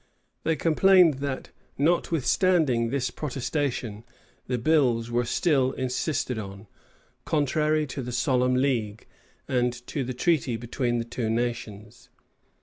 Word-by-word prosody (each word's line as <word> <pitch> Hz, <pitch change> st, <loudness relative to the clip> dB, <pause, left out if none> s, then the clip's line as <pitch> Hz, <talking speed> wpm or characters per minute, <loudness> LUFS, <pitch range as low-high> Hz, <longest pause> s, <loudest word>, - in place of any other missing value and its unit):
They 160 Hz, -, +1 dB
complained 165 Hz, -1 st, +4 dB
that, 140 Hz, -2 st, -4 dB, 0.3 s
notwithstanding 160 Hz, -4 st, +2 dB
this 125 Hz, -1 st, -1 dB
protestation, 130 Hz, -6 st, -3 dB, 0.4 s
the 125 Hz, -, -1 dB
bills 120 Hz, -4 st, +2 dB
were 120 Hz, 0 st, +1 dB
still 130 Hz, 0 st, +1 dB
insisted 130 Hz, -1 st, -2 dB
on, 100 Hz, 0 st, -8 dB, 0.6 s
contrary 155 Hz, +1 st, +1 dB
to 135 Hz, 0 st, -5 dB
the 125 Hz, 0 st, -5 dB
solemn 125 Hz, 0 st, +1 dB
league, 120 Hz, -6 st, -1 dB, 0.4 s
and 125 Hz, -1 st, +1 dB
to 140 Hz, -, -3 dB
the 130 Hz, 0 st, -5 dB
treaty 135 Hz, -4 st, +1 dB
between 120 Hz, +1 st, -2 dB
the 115 Hz, -, -2 dB
two 120 Hz, -1 st, -3 dB
nations. 115 Hz, -2 st, -4 dB
125 Hz, 120 wpm, -26 LUFS, 120-150 Hz, 0.6 s, complained